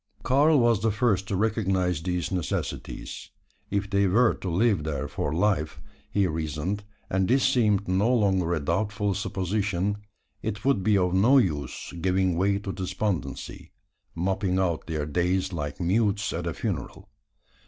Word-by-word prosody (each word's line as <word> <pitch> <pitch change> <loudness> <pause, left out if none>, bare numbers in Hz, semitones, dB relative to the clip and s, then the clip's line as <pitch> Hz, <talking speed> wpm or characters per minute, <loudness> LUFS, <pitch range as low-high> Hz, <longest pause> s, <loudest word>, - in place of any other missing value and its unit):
Karl 145 +3 +4
was 120 -4 +3
the 110 - +2
first 105 -3 +1
to 100 - -1
recognise 95 -5 0
these 90 +1 -2
necessities. 90 -3 -4 0.4
If 100 0 -1
they 100 0 +2
were 115 +6 +4
to 95 - -5
live 95 -1 +2
there 75 -2 -3
for - - -3
life, 80 -4 0 0.3
he 100 -1 +2
reasoned, 80 +4 -2 0.2
and 95 0 +1
this 130 +3 +3
seemed 105 -6 +2
no 95 +6 +2
longer 95 -7 +2
a - - -1
doubtful 100 - -1
supposition, 100 0 -1 0.4
it 110 +1 -4
would 135 -8 +3
be 105 +1 +3
of 90 -1 +1
no 115 +9 +5
use, 75 - -1
giving 95 -1 +2
way 100 +3 +2
to 100 -1 -5
despondency 90 - -4 0.4
moping 95 +1 0
out 90 -4 0
their 80 -3 -2
days 90 +4 0
like 75 -3 -4
mutes 100 +3 +1
at - - -3
a - - -1
funeral. - - -4
95 Hz, 155 wpm, -26 LUFS, 90-105 Hz, 0.4 s, no